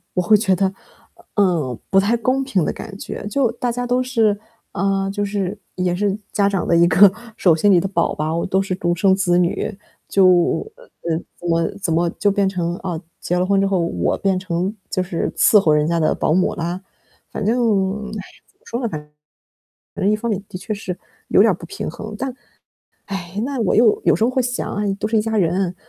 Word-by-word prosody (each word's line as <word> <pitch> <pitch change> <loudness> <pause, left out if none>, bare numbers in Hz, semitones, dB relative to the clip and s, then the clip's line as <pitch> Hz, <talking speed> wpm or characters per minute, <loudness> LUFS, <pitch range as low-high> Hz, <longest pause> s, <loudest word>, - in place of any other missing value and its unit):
我 180 - +2
会 195 +5 +5
觉 200 -3 +2
得， 190 +1 0 0.6
嗯， 170 - +1
不 195 - +5
太 215 +5 +2
公 255 +3 0
平 250 -10 0
的 - - 0
感 195 -3 -9
觉。 - - -7
就 250 +3 +1
大 245 0 -2
家 245 +1 -3
都 250 +1 +1
是 225 -5 +2 0.4
啊， 195 0 0
就 205 +1 -2
是 200 -1 -2 0.2
也 180 -1 0
是 200 +1 0 0.2
家 200 -1 +3
长 195 -2 -1
的 170 - +3
一 170 0 +6
个 190 +4 +7 0.3
手 175 -4 +4
心 200 +6 +3
里 180 - +6
的 185 - -1
宝 170 -4 0
宝， 160 +2 -1
都 190 +1 +1
是 190 -1 -2
独 175 -2 0
生 190 +2 +3
子 180 -2 +2
女， 185 +3 -1 0.3
就， 195 -1 +4 0.5
呃， - - -18 0.5
怎 175 - -6
么 165 -1 +2
怎 165 - 0
么 170 +1 +2
就 205 - +3
变 200 -1 +1
成 175 -3 -2
了 175 - -7
啊， 175 -4 -3 0.2
结 180 - -1
了 180 - +2
婚 195 0 +2
之 - - +2
后， 195 -2 +1
我 90 - 0
变 195 -1 +1
成 185 +2 -2
就 185 - 0
是 175 -2 -2
伺 215 - +6
候 165 -5 +2
人 150 0 +2
家 170 0 +1
的 155 - +2
保 155 - +1
姆 185 +2 +2
啦？ 175 +2 -3 0.5
反 205 - -4
正， 210 -3 +1
哎 - - -4
呀， 195 - -11
怎 - - -46
么 - - -48
说 240 +2 -4
呢， 235 - 0
反 150 -5 -7 0.9
正 195 - +1
一 - - +3
方 235 +2 -3
面 200 - -2
的 - - -6
确 190 +4 -4
是 190 -3 -5 0.3
有 - - +5
点 220 +1 +5
儿 - - -1
不 170 - -10
平 - - -5
衡。 210 +6 -7
但， 265 +1 -3 0.7
唉， 195 -1 -5
那 275 -2 -3
我 215 - +1
又 225 -2 +4
有 - - +5
时 - - 0
候 235 - +3
会 260 0 +1
想 245 0 -3
啊， 205 - -2 0.2
都 215 - -1
是 220 +1 +1
一 - - +3
家 220 0 -1
人， 180 0 +1
195 Hz, 245 characters per minute, -20 LUFS, 175-215 Hz, 0.9 s, 个